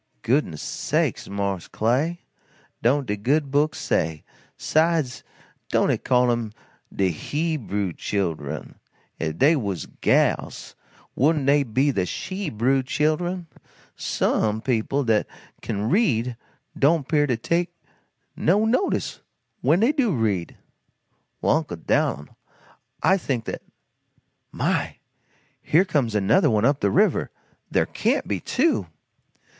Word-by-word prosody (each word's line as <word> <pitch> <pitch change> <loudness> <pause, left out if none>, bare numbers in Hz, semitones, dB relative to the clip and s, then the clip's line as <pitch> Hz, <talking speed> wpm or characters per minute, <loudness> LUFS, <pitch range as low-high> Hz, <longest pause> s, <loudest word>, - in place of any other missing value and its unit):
"Goodness 115 - 0
sakes, - - -1
mars 100 -3 -2
Clay, 140 +10 0 0.6
don't 135 +4 +2
de 105 -3 -1
Good 135 +7 0
Book 145 +2 +2
say? 80 -1 -1 0.3
'Sides, 155 -5 +1 0.5
don't - - +2
it - - -2
call 125 -1 +3
'em 115 -3 -2 0.4
de 95 -1 +1
HE 155 - -2
brew 100 - -3
chil'en? 80 -8 -3 0.4
If 80 -1 -3
dey 150 +5 +5
was 100 - -3
gals - - 0 0.4
wouldn't 150 0 +2
dey 145 +1 +4
be 135 +3 +1
de 95 -7 -1
SHE 190 - -4
brew 130 +4 +1
chil'en? 155 +6 -1 0.5
Some 110 0 0
people 130 +3 0
dat 110 -3 +2 0.3
kin 105 +1 -2
read 125 - +1 0.4
don't 145 0 +2
'pear 150 -2 +2
to 125 -4 0
take 170 +8 0 0.6
no 200 +7 +2
notice 255 - 0 0.4
when 175 - +3
dey 235 +5 +4
do 275 -8 +1
read." 105 -7 -1 0.9
"Well, - - +4
Uncle 155 - -4
Dan'l, 75 -3 0 0.8
I 190 - +5
think 130 - -2
that - - -5 0.9
My! - - -1 0.7
here 170 +5 +3
comes 135 - 0
another 115 - +3
one 110 -1 +2
up 140 +1 +3
the - - +2
river! 210 +4 +2 0.4
There - - +2
can't - - 0
be - - -1
two!" 315 +6 +1
135 Hz, 125 wpm, -24 LUFS, 105-160 Hz, 0.9 s, dey